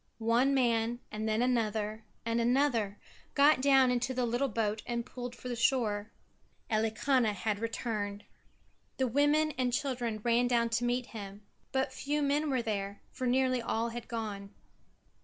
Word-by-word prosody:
One 235 +5 +2
man 235 -2 +1
and 215 +1 -2
then 220 +2 +2
another 220 -3 0 0.2
and 230 0 +1
another 235 -5 +2 0.4
got 285 -1 +5
down 270 -2 +5
into 250 +1 -1
the 250 -1 +1
little 240 +4 0
boat 215 -2 -1
and 235 -1 -2
pulled 245 -1 -7
for - - -9
the 245 - -2
shore. 225 -4 +1 0.6
Elikana 220 +2 +2
had 205 +2 -2
returned. 215 -3 -3 0.7
The 260 - +1
women 290 +5 +3
and 250 -1 +1
children 245 -4 -1
ran 240 +1 +3
down 235 -1 +2
to 235 +1 0
meet 245 +1 0
him 205 -2 -9 0.3
but 265 0 0
few 290 +2 -1
men 290 +2 +1
were 260 -3 0
there, 200 -3 -3
for 255 - -3
nearly 255 0 +2
all 230 0 -1
had 235 0 -7
gone. 210 -3 -5
235 Hz, 160 wpm, -31 LUFS, 220-255 Hz, 0.7 s, got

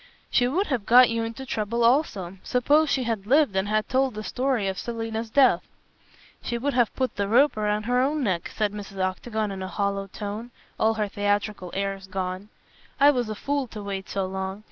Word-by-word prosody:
"She 245 - +3
would 355 +11 +1
have 245 - -2
got 250 0 +7
you 230 0 -1
into 230 +4 -6
trouble 230 0 -1
also. 210 - +1
Suppose 290 +5 +2
she 265 -2 +1
had 220 -4 -3
lived 280 -5 +4
and 190 +1 +1
had 215 0 0
told 260 -2 +1
the 215 - -5
story 250 -3 0
of 190 -1 -2
Selina's 225 -1 -4
death." 245 -8 +4 0.8
"She 235 - -3
would 280 +4 -1
have 240 -3 +3
put 260 -4 -2
the 200 -1 0
rope 260 +8 +4
round 210 0 -1
her 245 +1 +2
own 290 +2 0
neck," 185 -7 -1
said 210 -2 -1
Mrs. 200 -1 -8
Octagon 210 +3 -2
in 190 -1 -6
a 185 - -3
hollow 200 0 -2
tone, 210 +4 -6 0.3
all 220 0 +3
her 210 -1 0
theatrical 205 -1 -1
airs 195 0 -3
gone. 185 +1 -4 0.5
"I 285 +1 +7
was 245 -5 -1
a 215 - -3
fool 280 +3 -2
to 215 -2 -8
wait 195 -1 -5
so 195 -1 -1
long. 190 +1 -4
215 Hz, 205 wpm, -25 LUFS, 200-250 Hz, 0.8 s, got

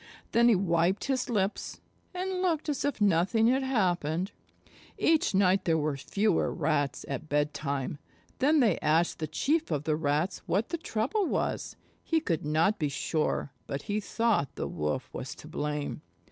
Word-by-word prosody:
Then 235 +1 +5
he 230 - +6
wiped 180 0 +1
his 265 -1 -1
lips, 205 -3 -1 0.3
and 370 0 -3
looked 330 -5 0
as 285 - -1
if 285 -4 -1
nothing 200 +3 +3
had 265 +2 +2
happened. 185 - 0 0.7
Each 315 -10 +2
night 190 0 +3
there 165 -2 +3
were 150 -2 0
fewer 200 +8 +1
Rats 145 -3 -1
at 140 +3 -5
bedtime. 145 -1 -1 0.4
Then 295 +3 +4
they 215 -8 +3
asked 160 +3 +2
the 155 - -2
Chief 300 - 0
of 145 -2 -1
the 155 0 +1
Rats 155 +4 0
what 205 +5 0
the 335 - -2
trouble 310 - -1
was. - - -2 0.3
He 325 - +2
could 165 - -1
not 160 +7 +2
be 150 -3 0
sure, 150 -1 -1 0.2
but 140 +1 -4
he 210 +1 -1
thought 220 - 0
the - - -3
Wolf 75 0 -2
was - - -5
to - - -12
blame. 150 0 -3
185 Hz, 165 wpm, -29 LUFS, 150-240 Hz, 0.7 s, he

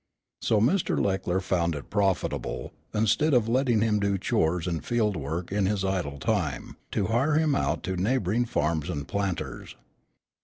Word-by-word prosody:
So 110 - +2
Mr. 155 - +2
Leckler 95 -2 0
found 85 -3 0
it 70 - -8
profitable, 100 -3 -1 0.2
instead 110 +8 +2
of 115 -3 +3
letting 120 -2 +2
him 110 -2 +2
do 100 -1 +1
chores 85 -2 0
and 85 -3 -2
field 110 -4 +1
work 80 +5 -4
in 100 -1 +1
his 100 -1 0
idle 90 -7 -1
time, 85 - -2 0.2
to 100 - +1
hire 130 +8 +2
him 155 -1 +3
out - - 0
to 95 - -2
neighboring 110 +3 +1
farms 80 -5 -1
and 70 -5 -4
planters. 100 -5 -3
100 Hz, 160 wpm, -27 LUFS, 90-115 Hz, 0.2 s, of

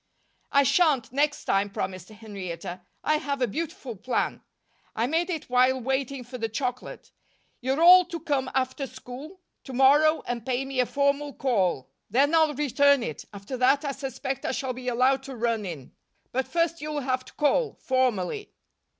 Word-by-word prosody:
"I 280 0 +5
shan't, 285 -6 +3
next 290 +2 0
time," 195 +1 +1
promised 185 -2 -5
Henrietta. 190 -5 -7 0.2
"I 305 - +2
have 280 -1 -3
a 250 - +3
beautiful 270 -1 -5
plan. 245 +6 -2 0.5
I 225 - +1
made 330 +7 0
it 325 -4 -4
while 255 +1 +3
waiting 265 +1 -2
for 250 +1 -9
the 225 0 -2
chocolate. 250 +2 -4 0.5
You're 270 +5 0
all 360 +1 +9
to 340 -1 -6
come 280 -3 -1
after 265 +1 -1
school 290 +11 -10 0.2
to 265 - -9
morrow 290 +5 +5
and 240 -2 -3
pay 255 +2 -1
me 270 -1 -4
a 250 - +3
formal 280 0 0
call. 190 - 0 0.2
Then 275 +8 +3
I'll 315 -3 +4
return 280 -1 +3
it. 155 - -5
After 205 +5 -7
that, 270 +4 +3
I 280 - 0
suspect 265 -1 -4
I - - -1
shall 260 -1 -2
be 250 0 -8
allowed 255 +2 +2
to 270 -1 -8
run 230 -3 -1
in. 150 -7 -8 0.4
But 260 +1 -1
first 335 -1 0
you'll 300 -1 -3
have 255 -1 -1
to - - -15
call, 415 - +1
formally." 260 - -1
265 Hz, 175 wpm, -26 LUFS, 240-290 Hz, 0.5 s, all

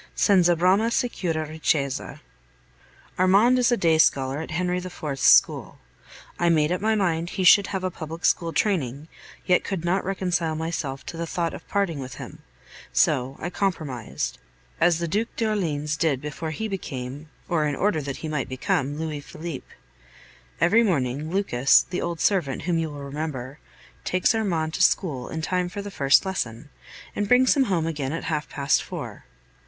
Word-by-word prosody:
Senza 180 -4 +4
brama 190 +7 +3
sicura 170 -10 -1
ricchezza. 150 -3 -2 1.0
Armand 205 +7 +5
is 250 0 +3
a 240 - +3
day 165 -4 +3
scholar 135 -2 +3
at - - -7
Henry 180 +2 -1
IV.'s 160 -6 -6
school. - - +4 0.6
I 175 - +3
made 155 -1 +3
up 180 - -1
my 220 +1 +2
mind 170 -4 0
he 185 - -3
should 195 +2 +7
have 190 -2 -3
a 185 - -1
public 165 +1 -6
school 170 -1 +2
training, 155 - -1 0.4
yet 180 -1 +3
could 185 -4 -4
not 185 +3 +1
reconcile 180 -4 -1
myself 155 -5 -4
to 165 - -7
the 170 0 -3
thought 170 0 -2
of - - -10
parting 195 -7 -1
with 130 -2 -7
him; - - -9 0.5
so 130 +1 +2
I 175 - -4
compromised, 155 - -3 0.4
as 170 -1 +4
the 170 0 -2
Duc 210 +7 0
d'Orleans 165 -10 -1
did 155 -4 +1
before 150 +3 -5
he 220 +8 -3
became 145 -6 -6 0.2
or 155 -3 +1
in 145 - -1
order 190 -4 +1
that 140 -1 -5
he - - -2
might 150 -4 -2
become 135 +2 -1
Louis 155 -2 -3
Philippe. 155 -1 -7 0.9
Every 220 +7 +5
morning 150 - 0
Lucas, 160 -9 +3
the 180 - -3
old 170 -1 -3
servant 170 -10 +1
whom 175 -2 0
you 160 -1 -2
will 145 -1 -8
remember, 140 -2 -5 0.4
takes 185 +5 +2
Armand 170 -8 -1
to - - -2
school 150 -9 +1
in 160 0 -5
time 180 +1 0
for 200 +2 -6
the 205 - -7
first 140 +2 +4
lesson, 140 -8 -4 0.4
and 205 - -1
brings 250 +4 +5
him 270 -2 +3
home 175 -7 0
again 150 -4 -3
at 165 - -4
half 155 -2 -2
past 140 -1 +1
four. - - -8
165 Hz, 175 wpm, -24 LUFS, 145-185 Hz, 1.0 s, should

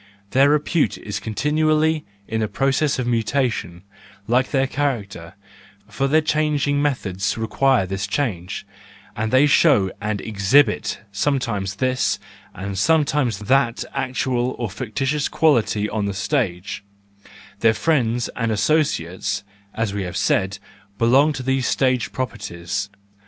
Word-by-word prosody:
Their 135 +2 +5
repute 150 +2 +1
is 105 - -5
continually 155 +6 +1 0.2
in 110 -1 -1
process 135 +4 +1
of 125 - -2
mutation, 115 -6 -1 0.4
like 125 +3 +2
their 135 -2 +2
character, 105 -11 -3 0.5
for 135 - -1
their 155 +3 +4
changing 150 -2 +1
methods 100 -11 -1
require 120 0 +2
this 95 +1 -3
change, 100 -8 -3 0.5
and 110 +1 -2
they 130 +3 +5
show 135 - +4
and 105 -1 -2
exhibit 105 +3 +2
sometimes 105 -4 -1
this 130 +4 0 0.4
and 95 +1 -4
sometimes 150 -4 +2
that 120 +2 +2
actual 130 -2 -1
or 115 -5 -3
fictitious 130 +7 -2
quality 115 -9 +2
on 105 -1 -2
the 100 - -3
stage; 100 - -2 0.8
their 110 0 +4
friends 120 -2 +1
and 115 -2 -1
associates, 105 - 0 0.3
as 115 -3 -1
we 100 - -2
have 90 -2 -4
said, 95 +1 +1 0.4
belong 130 +7 +4
to 135 -3 -5
these 135 0 0
stage 130 -6 +1
properties. 100 -5 -4
120 Hz, 125 wpm, -21 LUFS, 100-140 Hz, 0.8 s, Their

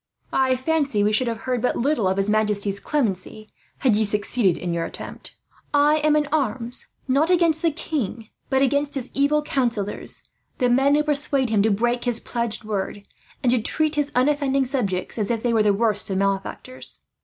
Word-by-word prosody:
I 260 -1 +3
fancy 275 -5 0
we 210 +1 +2
should 250 +3 +2
have 230 -1 -3
heard 250 -2 -1
but 250 - +1
little 250 -5 +1
of 190 +1 0
his 195 0 +1
majesty's 210 -2 0
clemency, 215 -6 -2 0.3
had 255 -6 +3
you 215 - +2
succeeded 205 -2 +1
in 175 -1 -3
your 170 0 -1
attempt. - - -8 0.4
I 295 +1 +4
am 305 0 +2
in 300 0 +2
arms, 245 -5 -1 0.2
not 280 +5 +2
against 335 -3 +3
the 335 - +3
king, 245 -8 -4 0.2
but 265 0 +2
against 285 +2 +1
his 260 -2 -5
evil 295 +2 +2
counsellors; 235 -8 -2 0.3
the 250 -2 +2
men 270 +4 +4
who 300 - +2
persuade 280 -4 +1
him 210 -2 +3
to 220 - +3
break 240 +4 0
his 240 -2 +1
pledged 235 -2 -3
word, 205 -1 -4 0.4
and 245 - +3
to 245 -2 +2
treat 310 +6 +1
his 295 -1 -1
unoffending 275 0 +2
subjects 225 -7 -2
as 205 - -1
if 230 -2 -1
they 240 -1 +1
were 225 - +3
the 210 -1 +4
worst 210 0 +1
of 190 - -1
malefactors. 195 +6 -3
245 Hz, 190 wpm, -23 LUFS, 210-285 Hz, 0.4 s, I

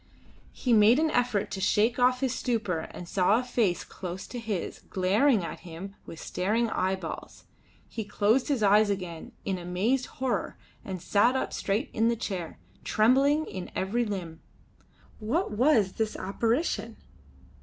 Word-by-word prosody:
He 245 - 0
made 220 +3 +6
an 315 0 +2
effort 245 -6 0
to 190 - -4
shake 225 +6 +2
off 250 +1 +3
his 260 -2 +1
stupor 210 -12 -1
and 175 - -9
saw 190 +4 +3
a - - -3
face 230 -8 0
close 185 0 -7
to 245 - -7
his, 215 -6 -4
glaring 200 +4 +3
at - - -6
him 180 +3 -9
with 165 - -9
staring 220 +5 0
eyeballs. 185 -2 -3 0.4
He 225 - -5
closed 210 +4 +2
his 270 -7 0
eyes 205 +1 +5
again 180 -5 -4
in 190 -2 -1
amazed 195 +9 0
horror 260 -1 -2 0.3
and 190 -2 -5
sat 205 +8 +3
up 260 - -1
straight 205 +8 -1
in 225 +1 +2
the 235 - +2
chair, 185 -7 -5 0.3
trembling 275 +7 +3
in 185 -2 -6
every 215 +6 0
limb. 180 -7 -5 0.8
What 235 - -1
was 220 -3 +3
this 220 +1 -2
apparition? 230 - -1
215 Hz, 155 wpm, -28 LUFS, 190-245 Hz, 0.8 s, made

